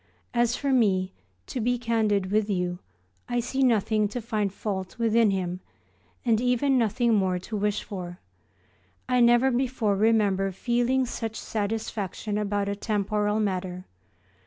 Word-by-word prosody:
As 240 0 +2
for 280 -1 0
me, 190 -6 +2 0.3
to 250 - -4
be 245 +2 +1
candid 215 -5 0
with 215 0 +1
you 180 -2 -1 0.5
I 240 0 +1
see 265 +3 -2
nothing 220 -4 +3
to 215 +5 -5
find 215 -4 -1
fault 190 -2 -4
within 230 -1 +3
him, 185 -2 -2 0.7
and 225 -2 +3
even 250 +2 +2
nothing 235 0 +2
more 190 -3 +2
to 185 +5 -6
wish 210 0 0
for. 180 -3 -7 0.9
I 250 -1 +2
never 240 +2 +5
before 240 -5 0
remember 200 -2 +2
feeling 245 +6 +1
such 225 -2 -4
satisfaction 210 -1 -3
about 205 -1 -1
a 200 - -1
temporal 210 0 0
matter. 185 -3 -2
215 Hz, 140 wpm, -26 LUFS, 195-240 Hz, 0.9 s, never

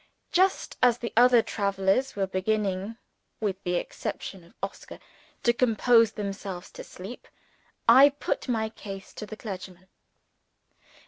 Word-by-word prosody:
Just 375 +2 +2
as 245 -2 +5
the 235 -1 -5
other 240 0 +6
travelers 200 +5 0
were 195 -1 0
beginning 195 +2 -1 0.4
(with 195 -3 -2
the 180 0 -1
exception 180 +1 -5
of 170 - -21
Oscar) 195 - -6 0.5
to 235 - +4
compose 230 -2 +4
themselves 195 -3 -5
to - - -9
sleep, 195 +7 -10 0.6
I 275 +2 +9
put 285 0 -3
my 220 -2 0
case 195 -3 -9
to 210 - -7
the 215 - -8
clergyman. 185 -3 -8
210 Hz, 130 wpm, -27 LUFS, 190-235 Hz, 0.6 s, I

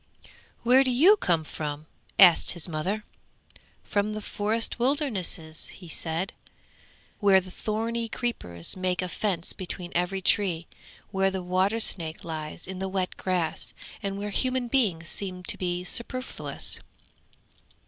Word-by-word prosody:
'Where 255 +3 +6
do 260 - +2
you 315 - +7
come 170 - +1
from?' 150 0 -5 0.3
asked 180 -4 +7
his 175 -1 +1
mother. 180 +7 -2 0.8
'From 210 +1 0
the 215 - -4
forest 220 +4 0
wildernesses!' 210 - -1
he 180 - -12
said, 165 +4 -2 0.9
'where 200 -2 +6
the 185 0 -10
thorny 225 +3 -2
creepers 90 - -1
make 185 -1 0
a - - -1
fence 180 -2 -1
between 180 -1 -3
every 180 +2 0
tree, 180 -3 +2 0.5
where 195 -1 +2
the 190 -1 -4
water 185 +5 +2
snake 165 -7 0
lies 155 -2 -5
in 190 0 -6
the 190 0 -2
wet 185 -1 -1
grass, 180 -4 -2 0.3
and 195 0 -3
where 205 +1 -3
human 255 +3 0
beings 205 -11 +2
seem 185 -2 -3
to - - 0
be 180 -1 -2
superfluous!' 255 +7 -1
190 Hz, 140 wpm, -27 LUFS, 175-215 Hz, 0.9 s, you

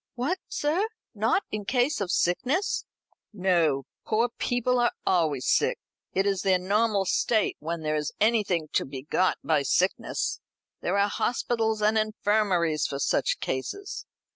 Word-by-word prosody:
"What, 285 +10 -1
sir? 330 +9 0 0.3
not 225 - +1
in 215 -1 -3
case 250 +4 +1
of 195 - -2
sickness?" 255 - 0 0.5
"No. 170 - +1 0.2
Poor 230 +2 +1
people 245 +1 +1
are 240 - +3
always 155 -8 +1
sick. - - +2 0.3
It 195 +1 +1
is 195 -2 +1
their 190 -2 +3
normal 200 +2 +1
state, 215 +3 +1
when 165 +2 -4
there 155 0 -1
is 150 -1 -2
anything 205 -8 +2
to - - +2
be 135 -1 -7
got 185 +5 +1
by 155 -3 +2
sickness. 180 +7 0 0.4
There - - 0
are 200 0 +4
hospitals 220 -1 0
and 215 +1 +4
infirmaries 205 -7 +1
for 140 - -4
such 140 - +1
cases. 395 - -4
200 Hz, 145 wpm, -27 LUFS, 170-230 Hz, 0.5 s, are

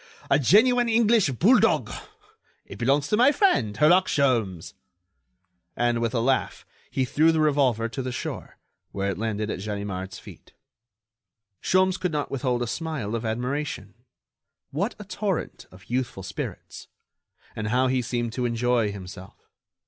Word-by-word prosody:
A - - +5
genuine 235 - +4
English 225 -5 +3
bulldog. 190 - +3 0.7
It - - -11
belongs 140 +4 +2
to 210 - +2
my 250 +5 +6
friend, 135 - +1
Herlock 180 - +5
Sholmes." 115 - 0 1.0
And, 120 -1 +1
with 115 +1 -1
a - - +2
laugh, 130 +3 0 0.2
he 130 - 0
threw 155 +6 +3
the 160 - 0
revolver 135 -7 +2
to 125 +4 -5
the 130 0 -4
shore, 120 - -6 0.3
where 100 0 -2
it 95 - -6
landed 110 -1 -2
at - - -4
Ganimard's 100 -2 -5
feet. - - -14 1.1
Sholmes 185 0 +2
could 180 - -1
not 150 -2 -3
withhold 125 -2 -1
a - - -1
smile 145 -6 -4
of 115 0 -2
admiration. 125 -2 -3 0.8
What 195 - -2
a 210 - -9
torrent 200 -2 -4
of 90 +1 -17
youthful 120 -6 -3
spirits! 95 - -7 0.7
And 110 0 -3
how 125 +4 +2
he 130 0 +1
seemed 120 -1 -3
to 125 0 -2
enjoy 120 -2 +1
himself! 95 -1 -10
125 Hz, 150 wpm, -25 LUFS, 110-160 Hz, 1.1 s, my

